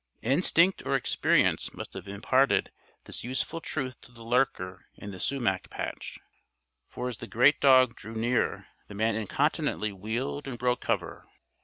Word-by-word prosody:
Instinct 170 +7 +3
or 135 - 0
experience 135 - +2
must - - -7
have - - -8
imparted 130 +7 +2 0.3
this - - -5
useful 130 +7 -3
truth 130 -6 -4
to - - -17
the 115 -1 -13
lurker 115 -7 0
in 100 - -8
the 95 - -9
sumac 120 -9 0
patch, - - -6 0.7
for 125 - -4
as 120 -4 -5
the - - -7
great 135 +5 +4
dog 130 -3 +6
drew 110 +1 -9
near 115 +2 0 0.2
the 100 - -10
man 110 +2 +1
incontinently 110 0 0
wheeled 115 +9 -4
and 125 -3 -5
broke 125 +1 0
cover. - - -2
120 Hz, 155 wpm, -28 LUFS, 110-135 Hz, 0.7 s, dog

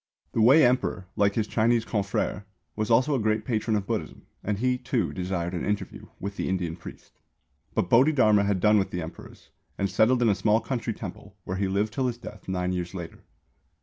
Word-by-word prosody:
The 115 - 0
Wei 135 +7 +7
Emperor, 120 -6 +1
like 100 -1 +2
his 110 - +1
Chinese 115 +1 +2
confrère, 100 -1 -2 0.3
was 105 0 -2
also 130 +6 +4
a 135 - +1
great 110 0 0
patron 110 -1 0
of 100 -2 -1
Buddhism, - - -4 0.2
and 105 -1 -1
he, 125 +3 +1
too, 125 -1 -1
desired 90 -1 -3
an 85 - -3
interview 105 0 -3
with 100 +1 -5
the - - -2
Indian 90 -3 -1
priest. 85 - -13 0.6
But - - +1
Bodhidharma 115 - +4
had 100 -2 +1
done 105 +3 +5
with 95 - -2
Emperors, 80 -2 -8 0.3
and 100 -1 -1
settled 120 +6 +3
in 115 - +4
a - - +4
small 105 +3 +2
country 115 -3 -3
temple, 100 0 -9
where 95 - -4
he 100 0 0
lived 100 +3 0
till 130 -1 0
his 120 -1 -3
death 105 -4 -11
nine 90 -1 -1
years 90 0 -3
later. 85 -3 -7
105 Hz, 200 wpm, -26 LUFS, 95-115 Hz, 0.6 s, Wei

